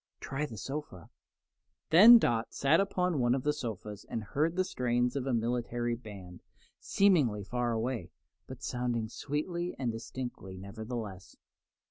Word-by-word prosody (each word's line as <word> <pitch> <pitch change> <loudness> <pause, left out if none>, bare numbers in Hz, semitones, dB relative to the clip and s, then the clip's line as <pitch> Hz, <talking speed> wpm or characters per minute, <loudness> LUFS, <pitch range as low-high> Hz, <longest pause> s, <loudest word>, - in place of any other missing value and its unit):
"Try 145 +3 -3
the 115 - -9
sofa." 135 - -6 0.8
Then 220 +9 +10
Dot 115 - 0
sat 145 +4 +4
upon 180 -5 0
one 120 0 +3
of 130 - -3
the 150 - +2
sofas, 105 -7 -6
and 115 - -3
heard 155 +10 0
the 185 - +2
strains 125 -6 0
of 135 -1 -2
a 130 - 0
military 120 +1 -1
band, 100 -6 -9 0.4
seemingly 150 - +3
far 120 +3 -1
away, 115 -5 -2 0.4
but - - -10
sounding 120 -3 -2
sweetly 170 +7 -3
and 125 -3 -1
distinctly, 115 -4 -7
nevertheless. 100 -1 -7
120 Hz, 140 wpm, -31 LUFS, 110-145 Hz, 0.8 s, Then